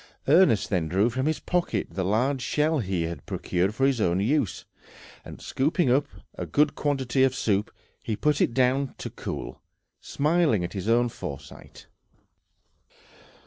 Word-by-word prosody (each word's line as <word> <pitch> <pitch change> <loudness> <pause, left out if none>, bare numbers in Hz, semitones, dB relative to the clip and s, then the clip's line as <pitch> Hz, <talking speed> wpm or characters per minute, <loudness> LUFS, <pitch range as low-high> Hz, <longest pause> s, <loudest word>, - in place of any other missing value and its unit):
Ernest 140 - +4
then 90 -5 0
drew 100 +8 +2
from 130 +4 -1
his 155 - 0
pocket 180 -1 -1
the 95 +3 -3
large 125 +8 +1
shell 150 +4 +1
he 95 -6 -1
had 85 +1 -5
procured 95 +4 -1
for 135 - +2
his 135 -4 +1
own 90 -1 +1
use, 115 0 0 0.6
and - - -10
scooping 150 +1 0
up 140 +3 +2 0.3
a 90 - -6
good 145 - +2
quantity 135 -3 0
of 130 -1 +2
soup 105 -4 0 0.3
he 110 - -3
put 150 +6 +1
it 115 - +1
down 130 +1 +1
to - - -6
cool, - - -6 0.4
smiling 150 - +1
at 85 - -5
his 100 +1 -3
own 120 +1 +3
foresight. 70 - -9
125 Hz, 155 wpm, -26 LUFS, 100-145 Hz, 0.6 s, Ernest